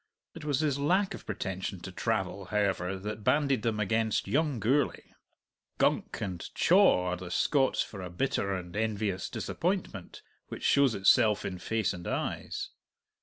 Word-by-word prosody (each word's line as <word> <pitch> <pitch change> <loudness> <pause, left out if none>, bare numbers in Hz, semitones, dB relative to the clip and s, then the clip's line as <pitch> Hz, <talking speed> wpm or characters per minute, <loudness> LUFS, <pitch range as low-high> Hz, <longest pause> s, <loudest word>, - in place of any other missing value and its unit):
It - - -10
was 145 -1 0
his 145 -3 0
lack 185 +6 +2
of - - -10
pretension 95 0 -4
to 95 - -7
travel, 100 -1 -2
however, 95 -2 0
that 105 +2 -6
banded 140 -1 +2
them 110 -1 -1
against 110 +1 0
young 145 -4 +1
Gourlay. 135 +7 0 0.6
"Gunk" - - +1
and 90 -4 -4
"chaw" 175 - +4
are - - 0
the 90 0 -8
Scots 135 - +2
for 100 - -9
a 90 - -6
bitter 100 +1 -1
and 90 -2 -5
envious 105 -3 -1
disappointment 175 - -3 0.2
which - - -8
shows 140 -4 +4
itself 105 +1 +4
in 90 -1 -4
face 110 0 0
and 90 -2 -8
eyes. - - -3
105 Hz, 155 wpm, -30 LUFS, 95-140 Hz, 0.6 s, chaw